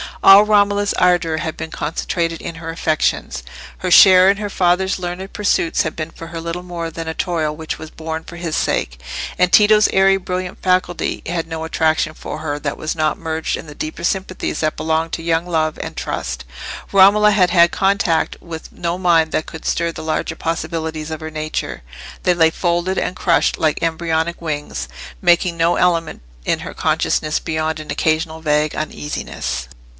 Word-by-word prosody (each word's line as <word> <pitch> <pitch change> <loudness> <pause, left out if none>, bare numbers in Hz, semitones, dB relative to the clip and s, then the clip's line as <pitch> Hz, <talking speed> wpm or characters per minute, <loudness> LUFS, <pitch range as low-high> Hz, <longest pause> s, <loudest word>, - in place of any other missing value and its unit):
All 195 +1 +9
Romola's 205 -1 +3
ardour 175 -3 +2
had 160 0 -4
been 160 - -5
concentrated 165 +2 -2
in 170 - -6
her 165 0 -7
affections. 155 - -1 0.4
Her 185 - -2
share 185 0 +8
in 200 - +3
her 210 -1 -4
father's 190 0 +1
learned 185 +1 -5
pursuits 200 -5 +1
had 155 - -4
been 155 0 -4
for 165 - -10
her 165 0 -6
little 170 +2 -4
more 170 -2 -5
than 165 0 -7
a 160 - -2
toil 160 -4 -1
which 160 0 -5
was 155 - -9
borne 160 0 -5
for 175 - -11
his 170 -2 -3
sake; - - -1 0.4
and 180 0 +3
Tito's 210 0 +6
airy 195 0 +4
brilliant 185 -1 -4
faculty 180 -1 0
had 165 -1 -2
no 160 -1 -5
attraction 160 -1 +1
for - - -6
her 145 -2 -3
that 145 -1 -3
was 155 - -3
not 155 -1 0
merged 160 0 -2
in - - -9
the 150 - -10
deeper 155 +3 -5
sympathies 185 0 -2
that 155 -1 0
belong 160 +1 0
to 165 - -4
young 165 0 +1
love 160 -3 0
and - - -6
trust. 60 - -4 0.5
Romola 205 +2 +6
had 185 -4 +3
had 170 -1 +5
contact 195 -4 +1
with 165 -2 -8
no 170 +1 -3
mind 170 -3 +3
that 155 - -1
could 160 - -9
stir 170 0 0
the - - -8
larger 155 0 -2
possibilities 160 -1 -3
of 155 - -4
her 160 0 -7
nature; 155 - -4 0.4
they 180 - +4
lay 165 -2 +4
folded 175 +2 -1
and 180 - -1
crushed 170 -3 +2
like 155 -1 +1
embryonic 165 0 -1
wings, 150 - -4 0.3
making 170 0 +3
no 170 +1 +3
element 170 -2 +1 0.2
in - - 0
her - - -7
consciousness 155 0 0
beyond 155 0 -2
an 155 - -7
occasional 160 0 0
vague 150 -1 +1
uneasiness. 150 - -4
165 Hz, 180 wpm, -19 LUFS, 160-180 Hz, 0.5 s, All